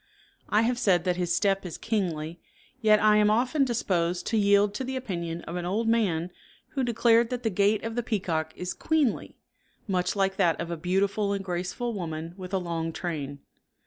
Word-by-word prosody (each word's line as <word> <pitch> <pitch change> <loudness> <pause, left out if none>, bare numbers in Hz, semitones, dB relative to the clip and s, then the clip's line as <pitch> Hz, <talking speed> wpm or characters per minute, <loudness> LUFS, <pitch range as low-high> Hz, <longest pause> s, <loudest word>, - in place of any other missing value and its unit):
I 210 +2 +3
have 240 +1 0
said 180 -6 +3
that 180 -1 0
his 175 -1 0
step 195 -1 +1
is 180 -3 -6
kingly, 170 -7 -2 0.4
yet 215 -1 +5
I 210 0 +5
am 210 0 +4
often 250 +7 +2
disposed 180 -8 0
to 225 - -1
yield 200 0 +4
to 235 - -3
the 265 +1 -4
opinion 170 -9 -4
of 170 - -5
an 175 - -3
old 220 +5 0
man 185 -7 +1 0.4
who 270 - -2
declared 235 -1 +3
that 250 -1 -4
the 225 - +1
gait 200 +3 +2
of 225 0 -3
the 240 - -1
peacock 175 -9 -2
is 180 0 -4
queenly, 305 -8 0 0.5
much 180 -1 0
like 195 -1 +1
that 175 -4 +2
of 170 0 -4
a - - -1
beautiful 195 +4 0
and 195 -1 -3
graceful 180 +7 -3
woman 165 -3 -5
with 185 -1 -8
a 195 - +1
long 165 -2 -3
train. 145 -5 -5
195 Hz, 195 wpm, -27 LUFS, 175-225 Hz, 0.5 s, yet